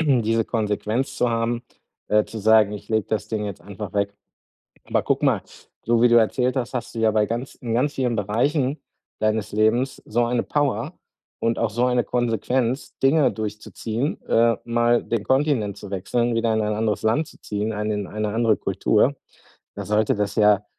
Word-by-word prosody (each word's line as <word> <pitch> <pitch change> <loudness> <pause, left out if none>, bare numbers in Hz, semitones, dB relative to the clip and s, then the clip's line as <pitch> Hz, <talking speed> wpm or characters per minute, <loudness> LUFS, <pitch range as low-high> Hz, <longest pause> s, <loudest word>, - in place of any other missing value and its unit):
diese 115 -7 +2
Konsequenz 110 +3 -1
zu 125 - +2
haben, 115 +1 -1 0.5
äh, 105 0 +3
zu 110 - -8
sagen: 110 0 +4
„Ich 105 - -8
lege 110 -3 0
das 110 -1 -2
Ding 110 -2 -2
jetzt 100 -1 -6
einfach 100 -1 -8
weg.“ 100 0 -1 0.7
Aber - - 0
guck - - 0
mal, - - +3 0.4
du 115 0 +3
wie 120 - +7
du 120 - +4
erzählt 125 +3 +3
hast, 125 0 -2
hast 120 -1 -4
du - - -3
ja 110 -1 +3
bei 105 0 +2
ganz 120 +5 -4
in 115 -3 -4
ganz 140 +5 +1
vielen 125 -3 0
Bereichen 130 +8 0 0.4
deines 110 -1 0
Lebens 110 +5 +1
so 120 +2 +1
eine 120 0 0
Power 145 -3 -1 0.4
und 115 0 0
auch 115 - +1
so 120 +3 +1
eine 125 -1 +2
Konsequenz, 120 +1 -1
Dinge 140 +2 +4
durchzuziehen, 110 +4 -4
äh, 115 -1 +3
mal 120 0 +2
den 115 -3 -2
Kontinent 130 -8 +1
zu 100 - -9
wechseln, 115 +5 0
wieder 115 -1 +1
in 110 - +1
ein 105 0 0
anderes 105 -2 -1
Land 115 +8 +1
zu - - -17
ziehen, 105 +2 -3
eine 105 +1 -2
in 100 -3 -4
eine 105 0 -3
andere 115 -2 +2
Kultur. - - +1 0.6
Da - - -5
sollte 105 0 +2
das 100 -1 -2
ja 105 -1 +4
115 Hz, 190 wpm, -23 LUFS, 105-120 Hz, 0.7 s, wie